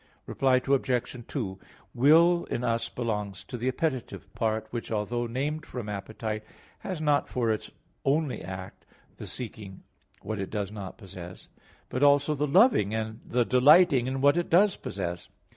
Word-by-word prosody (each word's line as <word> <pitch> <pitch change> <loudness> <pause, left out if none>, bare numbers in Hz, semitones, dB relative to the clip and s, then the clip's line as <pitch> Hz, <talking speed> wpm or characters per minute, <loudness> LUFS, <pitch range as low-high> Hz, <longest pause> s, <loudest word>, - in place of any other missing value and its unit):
Reply 130 -1 +2
Obj. 125 -3 0
2: 95 -9 -4 0.3
Will 165 +7 +5
in 120 - -3
us 115 -1 0
belongs 105 -5 -3
to - - -8
the 120 +1 -3
appetitive 125 - -3
part, 110 -1 -1
which, 120 -1 -5
although 115 +3 -1
named 145 +6 -2
from 120 -4 -6
appetite, 110 +1 -4 0.4
has 185 -4 -5
not 150 -2 +2
for 120 -3 0
its 110 - -3 0.3
only 145 0 0
act 95 0 -8 0.3
the - - -8
seeking 105 -5 -8 0.4
what 110 -1 -4
it 95 - -3
does 100 -2 -3
not 100 -3 -7
possess; 90 -3 -11 0.4
but 125 - -3
also 145 +1 +4
the 150 0 -1
loving 155 - +4
and 110 0 -3
the 120 0 +1
delighting 140 +1 +5
in 130 0 -2
what 145 +4 +5
it 175 - -1
does 190 +3 +5
possess. 85 -3 -5
120 Hz, 160 wpm, -28 LUFS, 105-145 Hz, 0.4 s, Will